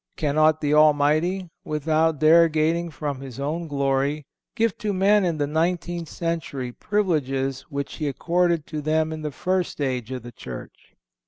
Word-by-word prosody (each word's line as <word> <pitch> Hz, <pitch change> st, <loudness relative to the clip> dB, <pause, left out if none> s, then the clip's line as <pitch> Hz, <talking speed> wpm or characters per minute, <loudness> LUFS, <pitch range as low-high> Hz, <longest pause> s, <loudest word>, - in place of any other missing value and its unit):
Cannot 155 Hz, +1 st, +2 dB
the 145 Hz, 0 st, +1 dB
Almighty, 155 Hz, +4 st, +3 dB
without 155 Hz, +1 st, +1 dB
derogating 165 Hz, +1 st, +4 dB
from 145 Hz, -3 st, -4 dB
His 135 Hz, -2 st, -9 dB
own 160 Hz, +4 st, -2 dB
glory, 140 Hz, +1 st, 0 dB, 0.3 s
give 225 Hz, -2 st, +1 dB
to 210 Hz, -3 st, -1 dB
men 200 Hz, +2 st, +4 dB
in 170 Hz, -3 st, 0 dB
the 145 Hz, -, +1 dB
nineteenth 170 Hz, +2 st, -1 dB
century 160 Hz, -7 st, -3 dB
privileges 135 Hz, -, -1 dB
which 140 Hz, 0 st, -4 dB
He 150 Hz, -, -2 dB
accorded 170 Hz, +2 st, +1 dB
to 155 Hz, -1 st, -5 dB
them 155 Hz, +1 st, +1 dB
in 155 Hz, -, -6 dB
the 155 Hz, -, -3 dB
first 180 Hz, +4 st, -2 dB
age 130 Hz, -5 st, -2 dB
of 130 Hz, -3 st, -5 dB
the 120 Hz, -, -9 dB
Church? -, -, -10 dB
155 Hz, 155 wpm, -24 LUFS, 140-170 Hz, 0.3 s, derogating